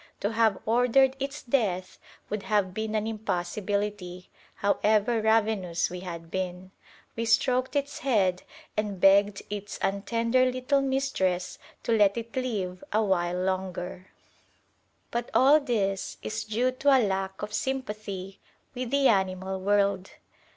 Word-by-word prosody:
To 205 Hz, -, 0 dB
have 220 Hz, -3 st, +3 dB
ordered 250 Hz, +3 st, +4 dB
its 280 Hz, +2 st, -4 dB
death 200 Hz, -8 st, -1 dB, 0.3 s
would 210 Hz, 0 st, -3 dB
have 200 Hz, -3 st, 0 dB
been 220 Hz, +1 st, -3 dB
an 215 Hz, 0 st, 0 dB
impossibility, 205 Hz, -2 st, -3 dB, 0.2 s
however 215 Hz, +3 st, +2 dB
ravenous 215 Hz, -7 st, +1 dB
we 180 Hz, -, -5 dB
had 170 Hz, -2 st, -8 dB
been. 185 Hz, 0 st, -4 dB, 0.4 s
We 230 Hz, -, -2 dB
stroked 250 Hz, +4 st, +2 dB
its 285 Hz, 0 st, -1 dB
head 195 Hz, -9 st, +1 dB, 0.3 s
and 210 Hz, -3 st, -2 dB
begged 195 Hz, +1 st, +4 dB
its 205 Hz, -1 st, -5 dB
untender 230 Hz, +5 st, +1 dB
little 255 Hz, +2 st, +1 dB
mistress 265 Hz, -10 st, -1 dB, 0.2 s
to -, -, -1 dB
let 205 Hz, 0 st, +4 dB
it 230 Hz, 0 st, -6 dB
live 205 Hz, -8 st, -3 dB
a 220 Hz, +1 st, +2 dB
while 180 Hz, -2 st, 0 dB
longer. 185 Hz, -1 st, -3 dB, 1.0 s
But 235 Hz, 0 st, -2 dB
all 280 Hz, +4 st, +6 dB
this 200 Hz, -8 st, -1 dB
is 220 Hz, 0 st, -3 dB
due 235 Hz, +4 st, +1 dB
to 270 Hz, +1 st, +4 dB
a 245 Hz, -, +3 dB
lack 190 Hz, 0 st, -3 dB
of 210 Hz, 0 st, -5 dB
sympathy 210 Hz, -7 st, -4 dB, 0.3 s
with 250 Hz, -1 st, -4 dB
the 280 Hz, +1 st, +3 dB
animal 190 Hz, -1 st, 0 dB
world. 200 Hz, -1 st, +1 dB
210 Hz, 135 wpm, -27 LUFS, 190-235 Hz, 1.0 s, all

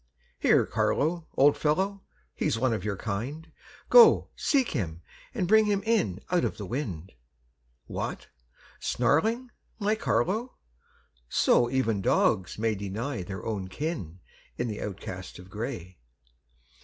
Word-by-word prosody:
Here, -, -, +4 dB
Carlo, 160 Hz, +2 st, 0 dB
old 140 Hz, +2 st, +6 dB
fellow, 190 Hz, +6 st, 0 dB, 0.3 s
he's -, -, 0 dB
one 125 Hz, 0 st, +1 dB
of 105 Hz, -, -3 dB
your 105 Hz, -2 st, -2 dB
kind, 130 Hz, -, -4 dB, 0.4 s
Go, 465 Hz, -3 st, +8 dB
seek 270 Hz, -5 st, +2 dB
him, 85 Hz, -, -3 dB, 0.3 s
and 195 Hz, -8 st, -2 dB
bring 220 Hz, +2 st, +6 dB
him 205 Hz, -1 st, 0 dB
in 185 Hz, -, +1 dB
out 180 Hz, -2 st, +3 dB
of -, -, -1 dB
the 105 Hz, -, -5 dB
wind. 95 Hz, -, -4 dB, 0.7 s
What! -, -, -5 dB, 0.5 s
snarling, 220 Hz, -, +1 dB, 0.3 s
my 210 Hz, 0 st, +1 dB
Carlo! 220 Hz, -, 0 dB, 0.7 s
So 120 Hz, -, +3 dB
even 120 Hz, -6 st, 0 dB
dogs 95 Hz, 0 st, +2 dB
may 110 Hz, +1 st, +1 dB
Deny 100 Hz, +5 st, -4 dB
their 95 Hz, +1 st, -7 dB
own 100 Hz, -4 st, -3 dB
kin 95 Hz, -, -5 dB, 0.4 s
in 120 Hz, -, -1 dB
the 105 Hz, -, -5 dB
outcast 95 Hz, -2 st, -6 dB
in 90 Hz, -, -11 dB
gray. 95 Hz, -, -6 dB
120 Hz, 130 wpm, -28 LUFS, -, 0.7 s, Go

